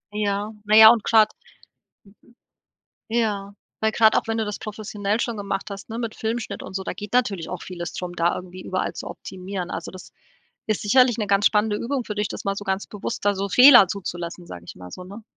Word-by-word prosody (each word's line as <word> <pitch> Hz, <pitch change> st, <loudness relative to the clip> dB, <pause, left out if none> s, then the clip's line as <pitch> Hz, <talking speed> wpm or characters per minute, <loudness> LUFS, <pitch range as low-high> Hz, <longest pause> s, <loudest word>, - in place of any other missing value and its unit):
Ja, 205 Hz, 0 st, -1 dB
na 210 Hz, +1 st, +3 dB
ja, 220 Hz, 0 st, +11 dB
und 230 Hz, -2 st, +1 dB
grad 220 Hz, -2 st, +4 dB, 1.8 s
Ja, 210 Hz, -4 st, -1 dB, 0.3 s
weil 220 Hz, 0 st, +2 dB
grad 220 Hz, -1 st, +4 dB
auch -, -, +1 dB
wenn 225 Hz, 0 st, -1 dB
du 220 Hz, -, -1 dB
das 210 Hz, -1 st, -5 dB
professionell 210 Hz, 0 st, -3 dB
schon 235 Hz, -1 st, -2 dB
gemacht 200 Hz, 0 st, -4 dB
hast, 200 Hz, +1 st, -9 dB
ne, 225 Hz, +2 st, -5 dB
mit 230 Hz, -2 st, -4 dB
Filmschnitt 225 Hz, +1 st, -4 dB
und -, -, -9 dB
so, 190 Hz, 0 st, -3 dB
da -, -, -4 dB
geht 205 Hz, +1 st, -9 dB
natürlich 210 Hz, -9 st, 0 dB
auch 180 Hz, -, -5 dB
vieles 175 Hz, -2 st, -6 dB
drum, 180 Hz, -1 st, -5 dB
da 170 Hz, 0 st, +1 dB
irgendwie 185 Hz, 0 st, -8 dB
überall 185 Hz, 0 st, -3 dB
zu -, -, -7 dB
optimieren. 185 Hz, -1 st, -7 dB
Also, 165 Hz, +1 st, -5 dB
das 185 Hz, -, -12 dB, 0.6 s
ist 215 Hz, -2 st, -1 dB
sicherlich 245 Hz, +3 st, +4 dB
'ne 210 Hz, -2 st, -2 dB
ganz 200 Hz, 0 st, +2 dB
spannende 210 Hz, -1 st, +3 dB
Übung 250 Hz, +3 st, -3 dB
für 210 Hz, -, -5 dB
dich, 210 Hz, 0 st, -1 dB
das -, -, -7 dB
mal 195 Hz, 0 st, 0 dB
so 205 Hz, -, -6 dB
ganz 190 Hz, 0 st, -2 dB
bewusst 205 Hz, +1 st, -6 dB
da 205 Hz, 0 st, +3 dB
so 195 Hz, +1 st, -3 dB
Fehler 250 Hz, -3 st, +8 dB
zuzulassen, 175 Hz, -2 st, -6 dB
sage 90 Hz, -1 st, -9 dB
ich -, -, -10 dB
mal 90 Hz, 0 st, -11 dB
so, 180 Hz, -, -9 dB
ne? 200 Hz, +5 st, -11 dB
205 Hz, 220 wpm, -23 LUFS, 190-220 Hz, 1.8 s, ja